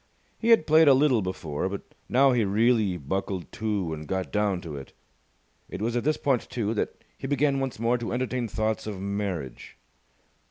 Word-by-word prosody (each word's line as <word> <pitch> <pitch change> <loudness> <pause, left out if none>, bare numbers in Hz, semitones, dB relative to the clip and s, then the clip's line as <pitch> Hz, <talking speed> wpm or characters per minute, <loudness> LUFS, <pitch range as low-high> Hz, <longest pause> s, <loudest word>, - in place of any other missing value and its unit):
He 230 - 0
had 225 -9 +6
played 155 +1 +6
a 140 - +8
little 130 -4 +3
before, 95 -3 -3
but 100 0 -5 0.3
now 135 +2 +5
he 120 -3 +2
really 105 -1 +2
buckled 95 +4 -3
to 105 -7 -2
and 75 -1 -7
got 95 -1 -2
down 105 -3 +1
to 80 -4 -7
it. 70 -1 -9 0.8
It - - -6
was 115 +3 -1
at 120 - 0
this 155 +1 +1
point, 135 -4 0
too, 110 -3 -1
that 105 - -3 0.2
he - - -4
began 140 0 +2
once 135 -2 -3
more 115 +2 +1
to 120 - -4
entertain 125 -1 -1
thoughts 110 0 -2
of 100 -3 -5
marriage. 95 -9 -4
110 Hz, 190 wpm, -26 LUFS, 95-130 Hz, 0.8 s, a